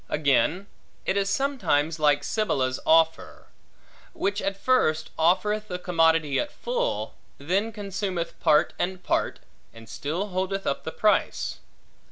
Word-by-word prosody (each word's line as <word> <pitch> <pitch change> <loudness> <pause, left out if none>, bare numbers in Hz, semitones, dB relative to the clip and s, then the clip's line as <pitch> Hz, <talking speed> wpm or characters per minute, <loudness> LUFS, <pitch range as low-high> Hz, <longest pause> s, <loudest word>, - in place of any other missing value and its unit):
Again, 150 +5 +1 0.4
it 190 - 0
is 200 -1 +1
sometimes 195 - 0
like 145 -1 +3
Sibylla's 135 - 0
offer; 160 0 +2 0.6
which 200 +1 -1
at 195 0 -2
first, 180 -10 +1
offereth 210 +6 +1
the 180 - -4
commodity 165 -5 +2
at 295 - -2
full, - - -2 0.2
then 190 +10 -1
consumeth 195 -4 -4
part 150 - +3
and 185 0 -2
part, - - -1 0.3
and 115 0 -13
still 170 - -3
holdeth 190 +1 -2
up 140 - -2
the 160 - -3
price. 210 +4 0
180 Hz, 130 wpm, -26 LUFS, 155-205 Hz, 0.6 s, like